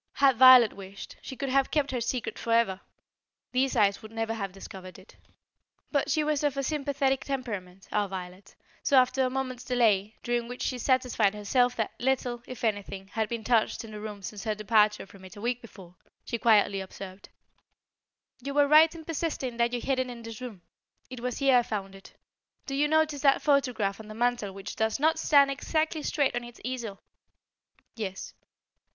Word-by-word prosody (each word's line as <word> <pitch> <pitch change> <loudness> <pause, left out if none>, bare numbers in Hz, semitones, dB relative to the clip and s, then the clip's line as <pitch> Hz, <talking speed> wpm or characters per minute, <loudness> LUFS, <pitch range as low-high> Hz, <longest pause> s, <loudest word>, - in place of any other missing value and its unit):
Had 270 -3 +4
Violet 255 -2 +9
wished, 195 0 -10
she 265 - -8
could 275 +1 -3
have 270 0 +2
kept 290 -3 0
her 250 -2 -2
secret 240 +1 -3
forever. 230 -5 +1 0.7
These 260 +1 +1
eyes 200 -1 +3
would 220 - -11
never 225 0 -2
have 200 -4 -4
discovered 185 -1 -10
it. 190 +1 -17 0.8
But 285 0 0
she 305 +2 +2
was 300 -1 0
of 285 -2 0
a 275 - 0
sympathetic 275 -2 0
temperament, 205 -9 -5
our 205 -1 0
Violet, 185 +1 -8 0.3
so 275 - +3
after 255 +1 +4
a 255 - +1
moment's 255 -1 -4
delay, 220 -5 +2
during 240 -1 -1
which 245 +1 -6
she 255 - -2
satisfied 245 -5 +2
herself 245 +4 +1
that 220 -3 -2
little, 245 -2 0
if 255 0 -9
anything, 200 -3 -2
had 220 +1 -2
been 235 -2 -4
touched 230 -1 +1
in 220 - -11
the 210 - -7
room 210 -2 -7
since 200 0 -6
her 215 -1 -1
departure 210 0 +2
from 195 0 -16
it 185 +3 -12
a 205 - -10
week 245 +1 -1
before, 190 -6 -13 0.3
she 235 - -3
quietly 205 -4 +4
observed: 190 0 -10 1.1
"You 280 +2 -5
were 290 -1 +5
right 315 +2 +6
in 320 -1 -10
persisting 295 -7 -3
that 235 0 +2
you 245 - -2
hid 265 +1 -1
it 255 -1 -1
in 235 -1 -9
this 230 +1 -8
room. 220 -8 -8 0.5
It 255 - -7
was 250 0 -3
here 270 -2 +4
I - - +5
found 200 -4 -5
it. 195 0 -15 0.5
Do 275 - -5
you 290 +2 +2
notice 310 -2 +1
that 275 -2 +3
photograph 250 -9 +1
on 220 - -10
the 215 - -9
mantel 240 -3 0
which 195 0 -8
does 220 +3 0
not 315 +2 +2
stand 280 -2 +5
exactly 310 +3 -1
straight 290 -2 0
on 245 - -2
its 240 0 -12
easel?" 240 -6 -5 0.9
"Yes." 195 -5 -5
240 Hz, 195 wpm, -28 LUFS, 210-265 Hz, 1.1 s, Violet